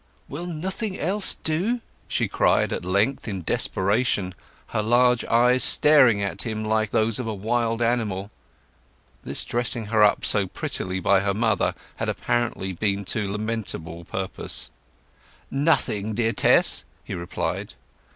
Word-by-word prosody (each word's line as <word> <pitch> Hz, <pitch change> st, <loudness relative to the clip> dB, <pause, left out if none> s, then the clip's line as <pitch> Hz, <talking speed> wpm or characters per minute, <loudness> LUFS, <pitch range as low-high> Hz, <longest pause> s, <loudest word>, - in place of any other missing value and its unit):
"Will 165 Hz, +6 st, -6 dB
nothing 185 Hz, +5 st, -4 dB
else 190 Hz, +5 st, 0 dB
do?" 185 Hz, +11 st, 0 dB, 0.3 s
she -, -, 0 dB
cried -, -, +2 dB
at -, -, -3 dB
length, 100 Hz, +10 st, 0 dB
in 95 Hz, -5 st, -4 dB
desperation, 100 Hz, +1 st, 0 dB, 0.4 s
her 110 Hz, -, -1 dB
large 120 Hz, +2 st, +3 dB
eyes 125 Hz, +2 st, +3 dB
staring 130 Hz, -9 st, +6 dB
at 100 Hz, -, -2 dB
him 110 Hz, -2 st, -3 dB
like 110 Hz, 0 st, +1 dB
those 110 Hz, +1 st, +1 dB
of 125 Hz, -, -4 dB
a 110 Hz, -, -2 dB
wild 115 Hz, +3 st, -1 dB
animal. 110 Hz, -5 st, -1 dB, 0.9 s
This -, -, -2 dB
dressing 120 Hz, -1 st, -1 dB
her 110 Hz, -1 st, +5 dB
up 105 Hz, -, +3 dB
so 100 Hz, -3 st, +1 dB
prettily 90 Hz, +1 st, -3 dB
by 100 Hz, +1 st, +3 dB
her 100 Hz, 0 st, -1 dB
mother 110 Hz, -2 st, +1 dB, 0.2 s
had -, -, -2 dB
apparently 120 Hz, -6 st, -2 dB
been 100 Hz, +2 st, -1 dB
to 105 Hz, -3 st, -2 dB
lamentable 105 Hz, -6 st, -4 dB
purpose. 95 Hz, +2 st, -4 dB, 0.8 s
"Nothing, 110 Hz, -8 st, 0 dB
dear 115 Hz, 0 st, +1 dB
Tess," -, -, +4 dB, 0.2 s
he -, -, -7 dB
replied. 85 Hz, -1 st, -4 dB
110 Hz, 140 wpm, -24 LUFS, 100-125 Hz, 0.9 s, staring